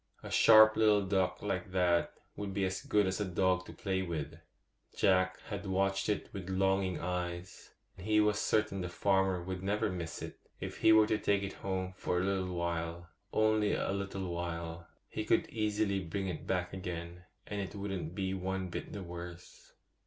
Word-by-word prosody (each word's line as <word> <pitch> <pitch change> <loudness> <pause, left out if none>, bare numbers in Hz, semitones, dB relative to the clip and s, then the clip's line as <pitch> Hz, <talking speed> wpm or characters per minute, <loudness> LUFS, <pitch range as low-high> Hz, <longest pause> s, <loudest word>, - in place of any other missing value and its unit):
A - - -7
sharp 110 -1 +8
little 105 -2 +4
duck 95 -1 0
like 95 -3 -2
that 90 -2 +2 0.2
would 100 -2 -5
be 100 -1 +1
as 95 0 -2
good 105 -1 +2
as 95 +2 -1
a - - +3
dog 95 0 +1
to - - -8
play 95 -2 -1
with. 80 -4 -3 0.6
Jack 95 -1 +3
had 100 -2 -6
watched 95 +1 +1
it 105 - -1
with 95 -2 -6
longing 95 -1 +1
eyes; 90 0 -4 0.2
he 105 +3 +2
was 105 0 +3
certain 105 -3 +1
the 90 - -3
farmer 95 0 +1
would 95 0 -4
never 105 +2 0
miss 85 -3 -5
it, - - -8 0.2
if - - -5
he 110 - +5
were 110 -1 +7
to 110 0 0
take 100 -1 +1
it 100 - -4
home 95 -1 -3
for 90 - -1
a - - 0
little 95 -2 -1
while—only 85 +6 0
a - - -1
little 95 -2 -3
while; 85 -1 -4 0.2
he - - -4
could - - +2
easily 105 -2 0
bring 95 +4 -3
it 85 -4 -5
back 90 -1 -1
again, 90 -1 -6 0.2
and 105 -1 -3
it 95 +1 -6
wouldn't 95 -5 -4
be 95 -2 -1
one 95 0 -2
bit - - -6
the 100 - -5
worse. 85 0 -9
95 Hz, 180 wpm, -33 LUFS, 90-100 Hz, 0.6 s, sharp